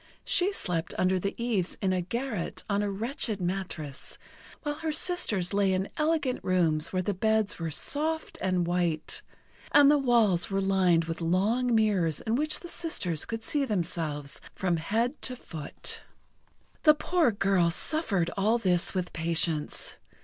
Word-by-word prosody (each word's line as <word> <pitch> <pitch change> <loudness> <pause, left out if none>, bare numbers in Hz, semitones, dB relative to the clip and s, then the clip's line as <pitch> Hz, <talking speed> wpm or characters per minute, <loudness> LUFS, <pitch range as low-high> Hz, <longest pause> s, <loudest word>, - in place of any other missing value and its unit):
She 370 +3 +3
slept 175 - -1
under 185 0 +2
the 200 +2 -3
eaves 225 -7 -1
in 190 -2 0
a 185 - 0
garret, 230 0 -4
on 200 -1 0
a 205 - -1
wretched 220 +1 -2
mattress; 175 -6 -4 0.5
while 295 -1 -3
her 320 -1 -2
sisters 300 - +2
lay 200 -1 +2
in 190 +1 -1
elegant 305 -4 0
rooms 170 -3 +1
where 185 -1 -1
the 205 - -1
beds 220 +1 +1
were 165 -1 -3
soft 310 - -1
and 185 -2 +1
white, 170 -3 -1 0.5
and 290 0 +7
the 295 - +4
walls 230 -8 +3
were 195 0 0
lined 185 -4 +2
with 165 +1 -5
long 215 +9 +1
mirrors 195 -8 +2
in 220 - -2
which 305 +4 0
the 345 - -8
sisters 210 - -2
could 225 0 -5
see 290 -2 0
themselves 165 - -2
from 180 -3 0
head 230 - -1
to 255 - -1
foot. 160 -10 -5 0.8
The 305 -2 +6
poor 330 -3 +1
girl 195 -4 +2
suffered 195 - +2
all 215 +4 +2
this 180 -4 +2
with 180 -1 -2
patience. 165 -2 -1
195 Hz, 155 wpm, -28 LUFS, 175-245 Hz, 0.8 s, and